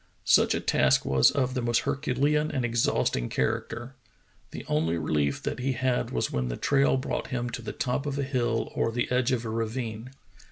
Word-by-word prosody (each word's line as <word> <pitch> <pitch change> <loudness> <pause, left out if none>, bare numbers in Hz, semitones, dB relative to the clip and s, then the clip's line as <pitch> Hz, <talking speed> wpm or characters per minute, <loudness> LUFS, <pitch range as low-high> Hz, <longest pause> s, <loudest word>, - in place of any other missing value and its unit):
Such - - +4
a - - 0
task - - +2
was 65 -1 +5
of 130 -2 0
the 130 - -1
most 120 -1 +1
herculean 145 +2 0
and 130 -5 -1
exhausting 115 - 0
character. 120 +3 -2 0.6
The - - -8
only 80 +2 +1
relief 75 -3 -1
that - - -3
he 130 +1 0
had 130 0 0
was 60 - -1
when 65 -1 -1
the - - -4
trail 140 -1 +2
brought 130 - -3
him 120 -2 -3
to 120 0 -5
the 115 - -5
top 130 +3 -2
of 140 -1 -2
a 140 - 0
hill 120 -4 -1
or 115 - 0
the 120 +2 -2
edge 125 0 +2
of 120 -2 -1
a - - -3
ravine. 115 +1 -3
120 Hz, 200 wpm, -27 LUFS, 110-130 Hz, 0.6 s, was